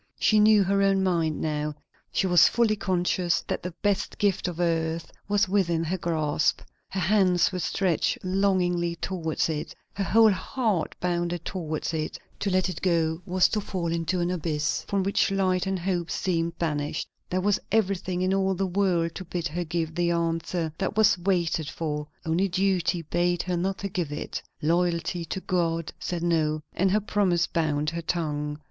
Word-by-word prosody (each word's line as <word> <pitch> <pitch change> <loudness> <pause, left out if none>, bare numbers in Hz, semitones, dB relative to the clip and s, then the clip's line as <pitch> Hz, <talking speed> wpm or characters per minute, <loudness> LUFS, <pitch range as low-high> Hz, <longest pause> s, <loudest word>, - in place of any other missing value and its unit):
She 215 - +4
knew 210 -1 +6
her 200 +1 +1
own 195 -1 +3
mind 165 -4 +1
now; 150 -1 -2 0.4
she - - +1
was 175 -2 +6
fully 230 -2 +2
conscious 180 -2 0
that - - -3
the 180 -1 -6
best 205 -2 0
gift 200 -2 +1
of 175 -1 -5
earth 165 -1 0 0.2
was 205 +1 +2
within 175 -4 +1
her 175 +3 -1
grasp; 155 -3 0 0.3
her 190 - -3
hands 185 -1 +3
were 185 - -3
stretched 180 0 0
longingly 185 -3 +1
towards 165 -2 -2
it, 155 -2 -4 0.2
her 200 - -2
whole 220 +4 +5
heart 210 -2 -1
bounded 175 -1 -1
towards 165 -3 -3
it; 155 -1 -3 0.2
to 200 - -1
let 185 0 +2
it 185 -4 -5
go 165 -2 +1
was 185 0 +4
to 210 - 0
fall 180 -4 -3
into 170 +2 -1
an 175 +1 0
abyss 155 -4 -1
from 200 -1 0
which 200 +1 +2
light 190 -1 +1
and 190 0 0
hope 175 -1 -2
seemed 170 -2 -1
banished; 150 -3 -2 0.2
there 185 - 0
was 200 +1 +2
everything 190 -4 0
in 185 +1 +2
all 195 0 +1
the 195 +2 0
world 180 -3 +1
to 190 - -6
bid 170 0 -3
her 175 +3 -2
give 160 -1 -2
the 175 +1 +1
answer 165 -1 -1
that 195 +2 -2
was 210 -2 +5
waited 170 -4 0
for; 150 -2 -3 0.2
only 165 +4 +1
duty 185 -2 +1
bade 175 +2 0
her 180 -1 -1
not 190 +3 -2
give 170 -5 -2
it. 150 - -4 0.2
Loyalty 170 +1 +1
to 175 - -4
God 165 -4 -1
said 175 -1 -3
no, 155 -3 +1
and 190 +2 +2
her 210 +3 +3
promise 190 -4 +1
bound 150 -2 0
her 170 0 -4
tongue. 150 -3 -2
175 Hz, 180 wpm, -26 LUFS, 165-190 Hz, 0.4 s, knew